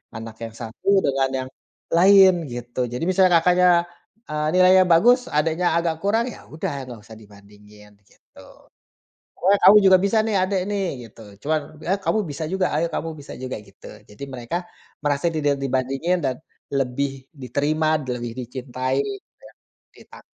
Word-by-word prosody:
anak 110 0 -8
yang 115 - -6
satu 115 - -5 0.2
dengan 135 -1 +1 0.2
yang 130 - -11 0.5
lain 190 +1 +7 0.2
gitu 120 +1 -7
jadi 125 - -5
misalnya 185 -1 +4
kakaknya, 180 +1 +4 0.6
eee, 150 0 -2
nilainya 185 +1 +6
bagus 240 +10 +5
adiknya 160 +4 +1
agak 170 -1 0
kurang 225 +4 +1
ya - - -13
udah 160 - -3 0.2
gak 120 -3 -9
usah 110 - -13
dibandingin 105 0 -18 0.2
gitu, - - -22 1.0
"Pokoknya 195 +3 +2
kamu 210 - +9
juga 190 0 +7
bisa 200 +3 +2
nih 215 -2 0
adek 190 0 0
nih," 200 -1 -1 0.2
gitu. 110 - -16 0.3
Cuman 155 -1 +2 0.3
ya, 185 - +2
"Kamu - - +1
bisa 145 +3 -5
juga 190 -1 +1
ayo 165 +2 +1
kamu 165 - -3
bisa 140 - -11
juga," 130 - -4
gitu 100 - -14 0.2
jadi 105 - -13
mereka 125 +5 -5 0.5
merasa 145 +1 0
tidak 145 -3 0
dibandingin 135 +7 -1
dan 130 -2 -1 0.4
lebih 135 +1 -1 0.3
diterima 150 +5 -1 0.3
lebih 120 -1 -6
dicintai 130 +1 -3
gitu 400 -1 -8
ya. - - -19 0.4
Dita - - -16
150 Hz, 155 wpm, -22 LUFS, 125-185 Hz, 1.0 s, kamu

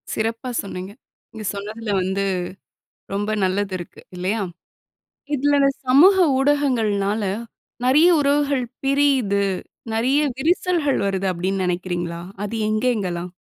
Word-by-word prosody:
சிறப்பா 230 +3 -2
சொன்னீங்க. 190 -1 -7 0.4
நீங்க 220 -1 -8
சொன்னதுல 210 +2 -5
வந்து 190 +2 -1 0.9
ரொம்ப 205 +2 -1
நல்லது 195 +1 0
இருக்கு, 175 - -10 0.2
இல்லையா? 195 +5 -1 0.9
இதுல 290 +1 +2
இந்த 275 0 +4 0.2
சமூக 305 +10 +7 0.2
ஊடகங்கள்னால 225 -8 +1 0.6
நெறய 300 +7 +6
உறவுகள் 280 -2 +2 0.2
பிரியிது. 270 -8 +2 0.5
நெறைய 250 +6 +2 0.2
விரிசல்கள் 330 -1 +1
வருது 195 -1 -1
அப்டீன்னு 185 +2 -1
நெனைக்கிறீங்களா? 175 -1 -2 0.2
அது 210 +2 -4
எங்கெங்கலாம்? 205 -6 -1
220 Hz, 105 wpm, -22 LUFS, 195-275 Hz, 0.9 s, சமூக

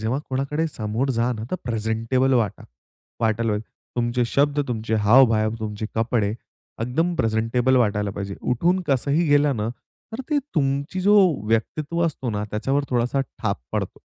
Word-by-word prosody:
जेव्हा 115 +5 -1
कोणाकडे 140 +5 -1
समोर 115 +1 -2
जा 120 +2 +2
ना, 110 -2 -6
तर 185 - 0
प्रेझेंटेबल 115 +3 0
वाटा 110 -6 0 0.6
वाटायला 115 0 +1
पाहिजे. 105 +1 -4 0.3
तुमचे 120 0 +1
शब्द, 145 +1 +2
तुमचे 110 -2 -2
हावभावा 110 -1 +5
तुमचे 105 0 -4
कपडे 115 -2 +1 0.5
एकदम 160 +10 0
प्रेझेंटेबल 115 +2 +1
वाटायला 105 -4 +1
पाहिजे. 100 0 -5
उठून 170 +10 +1
कसंही 140 +5 +2
गेला 145 0 +4
ना, 110 -3 -2 0.4
तर 225 - -4
ते 300 - +3 0.2
तुमची 140 +3 0
जो 205 +3 +4 0.3
व्यक्तित्व 150 +9 0
असतो 135 -6 -3
ना, 105 -1 -2
त्याच्यावर 135 +7 0
थोडासा 125 +2 +1
ठाप 110 -6 -3
पडतो. - - -3
120 Hz, 150 wpm, -23 LUFS, 110-140 Hz, 0.6 s, हावभावा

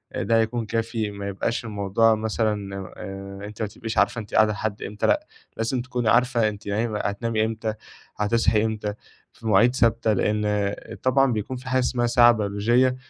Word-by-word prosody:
ده 115 +5 +2
هيكون 115 +1 0
كافي، 115 -1 -2
ما 100 0 -6
يبقاش 115 +4 -2
الموضوع 105 +1 +2
مثلًا 105 -2 -2 0.2
آآ، 100 0 -7
أنتِ 105 +1 -9
ما 110 - 0
تبقيش 110 +2 -6
عارفة 115 - +2
أنتِ 105 - -13
قاعدة 110 0 +5
لحد 105 +1 -4
إمتى، 105 +1 -2
لأ، 305 +1 +1 0.3
لازم 120 +3 -1
تكوني 125 -2 -1
عارفة 120 -2 +3
أنتِ 105 0 -9
نايمة 105 +1 -1
هتنامي 110 +2 -1
إمتى، 110 0 -3 0.4
هتصحي 105 0 +2
إمتى، 105 -2 -2 0.4
في 115 - -9
مواعيد 115 +4 +4
ثابتة؛ 115 -3 +2
لأن 105 -1 0 0.3
طبعًا 135 +1 +3
بيكون 110 +4 -3
في 130 +1 -8
حاجة 130 0 +2
اسمها 125 -1 +1
ساعة 120 0 +6
بيولوجية، 115 +4 +2
110 Hz, 170 wpm, -24 LUFS, 105-120 Hz, 0.4 s, ساعة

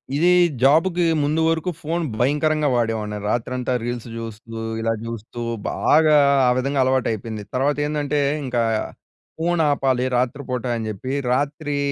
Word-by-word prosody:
ఇది 170 +5 +4 0.3
జాబ్‌కి 165 +6 +4 0.2
ముందు 155 +3 +1
వరకు 165 +2 0
ఫోన్ 165 +3 -2 0.2
భయంకరంగా 150 +3 +2
వాడేవాడిని. 110 -3 -1
రాత్రంతా 125 +2 -1
రీల్స్ 120 0 -4
జూస్తూ, 115 0 -7 0.2
ఇలా 115 0 +1
జూస్తూ 115 +1 -7 0.3
బాగా 155 0 +4 0.3
ఆ - - +5
విధంగా 135 +2 0
అలవాటయిపోయింది. 115 -4 -1
తర్వాత 140 +3 +1
ఏందంటే, 150 -1 -1 0.3
ఇంకా 125 -2 0 0.8
ఫోన్ 170 +1 +1
ఆపాలి 130 -3 +1
రాత్రిపూట 125 0 -2
అని 110 -1 -4
చెప్పి 110 +5 -5 0.2
రాత్రీ 145 +2 -1
130 Hz, 125 wpm, -22 LUFS, 115-150 Hz, 0.8 s, ఆ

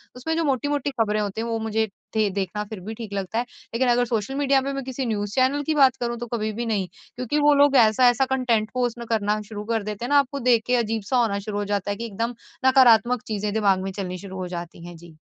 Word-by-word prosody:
उसमें 320 +6 -3
जो 330 - 0
मोटी-मोटी 285 0 0
ख़बरें 215 -1 +1
होती 205 +1 -3
हैं 230 - -3
वो 230 -1 -1
मुझे 220 0 0 0.3
दे 215 -2 +2
देखना 200 +1 -2
फ़िर 210 -1 -8
भी 220 +3 -5
ठीक 220 -2 -8
लगता 200 +3 -2
है। 240 - 0 0.3
लेकिन 250 +2 +1
अगर 245 0 +3
सोशल 230 +2 -2
मीडिया 275 -1 +2
पे 275 +1 -3
मैं 275 0 -4
किसी 260 0 -4
न्यूज़ 205 -2 -2
चैनल 270 +3 +2
की 310 +2 -1
बात 270 -3 +5
करूँ 240 0 -2
तो 240 - -5
कभी 215 -2 -1
भी 235 +3 -3
नहीं। 205 -5 -1 0.3
क्योंकि 250 +4 -1
वो 295 0 +5
लोग 285 0 +4
ऐसा-ऐसा 245 +3 +5
कंटेंट 235 -5 +1
पोस्ट 245 -2 -1
में 235 -1 -8
करना 215 -2 0
शुरू 210 -1 -6
कर 225 -1 -1
देते 210 +3 -5
हैं - - -5
ना 285 0 +6
आपको 280 0 -1
देख 230 -2 +4
के 250 - +3
अजीब-सा 225 0 0
होना 220 -5 +1
शुरू 205 +1 -5
हो 205 - -1
जाता 205 0 -1
है 200 - -3
कि 235 - -5
एकदम 230 +3 -3 0.3
नकारात्मक 250 -2 +5
चीज़ें 210 -1 -2
दिमाग़ 200 -3 +2
में 195 - -4
चलनी 185 -2 -5
शुरू 190 0 -9
हो 185 - -4
जाती 170 -1 -7
हैं। 175 - -9
जी। 165 -1 -15
225 Hz, 255 wpm, -24 LUFS, 205-255 Hz, 0.3 s, ना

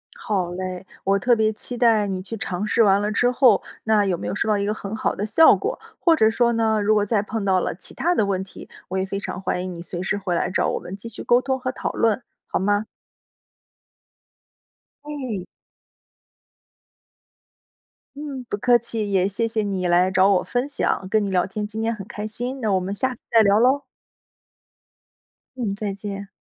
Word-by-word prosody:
好 190 -6 -2
嘞， 185 +1 -5 0.2
我 195 +1 +2
特 245 +4 +3
别 220 -1 +2
期 240 +3 -5
待 225 -4 +4
你 190 -1 -3
去 225 +4 -6
尝 190 0 -3
试 230 +2 +3
完 200 -1 +4
了 210 +1 -1
之 245 +3 +2
后， 250 0 +5 0.2
那 215 -2 +3
有 185 -3 0
没 - - -5
有 - - -2
收 210 - -1
到 210 -1 +3
一 200 - -1
个 210 - 0
很 210 0 -6
好 - - -1
的 205 - -2
效 320 +10 +6
果， - - -3 0.2
或 335 -2 +4
者 220 -7 +4
说 235 +1 +2
呢， 220 -1 +2
如 210 +1 +3
果 205 -1 +2
再 210 0 +1
碰 215 +1 -4
到 190 -1 +3
了 - - -2
其 - - -10
它 350 +2 +1
的 215 - +2
问 190 -1 -1
题， 190 - -12 0.2
我 190 - -3
也 190 - 0
非 195 +1 -4
常 190 -2 -6
欢 180 -1 -2
迎 185 - -4
你 170 -1 -7
随 175 0 -5
时 190 +2 -1
回 190 -3 -2
来 170 - 0
找 185 - +1
我 - - -2
们 185 - -8
继 205 +4 -9
续 225 - -8
沟 240 +1 +4
通 265 0 -1
和 255 0 -2
讨 - - -3
论， 225 +2 +1 0.3
好 - - -1
吗？ 205 +2 +1 2.2
哎。 260 -11 -5 2.7
嗯， 285 -3 -6
不 205 - -2
客 240 +3 +4
气。 220 -3 -4
也 190 -1 +3
谢 205 +3 -1
谢 225 -1 -1
你 190 -3 -1
来 175 +1 +4
找 190 0 +4
我 190 -2 +3
分 245 +2 -1
享 235 -8 -1
跟 215 +1 +2
你 200 - -2
聊 180 -2 +2
天， 210 +2 -4
今 220 +1 -4
天 225 +1 0
很 200 -3 -8
开 210 +1 -5
心， 245 +5 -4
那 215 -3 0
我 190 - +3
们 185 +2 -4
下 260 +5 -1
次 - - -19
再 225 - +6
聊 200 0 +4
喽。 265 +4 +3 1.7
嗯， 230 -6 -2
再 205 -1 -3
见。 200 0 -6
210 Hz, 225 characters per minute, -23 LUFS, 195-230 Hz, 2.7 s, 效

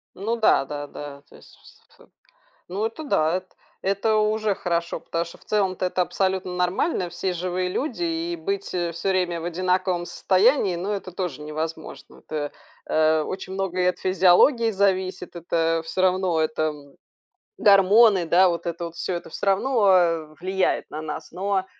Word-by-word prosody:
Ну 220 +5 -2
да-да-да, 145 -7 -1
то - - -16
есть - - -18
вс - - -20 0.2
ф - - -19 0.6
ну, 200 +4 -2
это 225 +8 -5
да, 160 - +2
эт 185 0 -12 0.3
это 200 +3 +1
уже 215 -1 +1
хорошо. 170 -2 -2
Потому 165 0 -3
что 170 - -12
в - - -24
целом-то 190 -3 0
это 180 0 0
абсолютно 190 0 -1
нормально: 180 - 0
все 185 +2 -3
живые 180 +1 -2
люди, 300 - -3
и 335 +1 -2
быть 395 +4 -3
всё 175 -2 -2 0.2
время 180 -3 +1
в 165 - -6
одинаковом 180 0 0
состоянии, 195 +2 +2
ну, 185 +4 -3
это 195 -2 -4
тоже 175 -6 -4
невозможно. 160 +1 -6
Тэ 150 -2 -3 0.4
э, 155 0 +3
очень 190 +4 -5
многое 185 -1 0
от 180 - -4
физиологии 190 - +4
зависит, 190 -3 -1
это 165 -1 0
всё 185 - -2
равно, 185 -3 +2
это 155 0 0 0.8
гормоны, 200 - +5
да, 180 +3 +5
вот 170 -1 -3
это 170 0 -3
вот 170 0 -8
всё, - - -3
это 175 - -5
всё - - -5
равно, 205 +3 +2
э, 165 -4 +2
влияет 190 +1 0
на 155 - -6
нас. 155 -1 -6
Но 190 0 -1
185 Hz, 160 wpm, -24 LUFS, 170-200 Hz, 0.8 s, гормоны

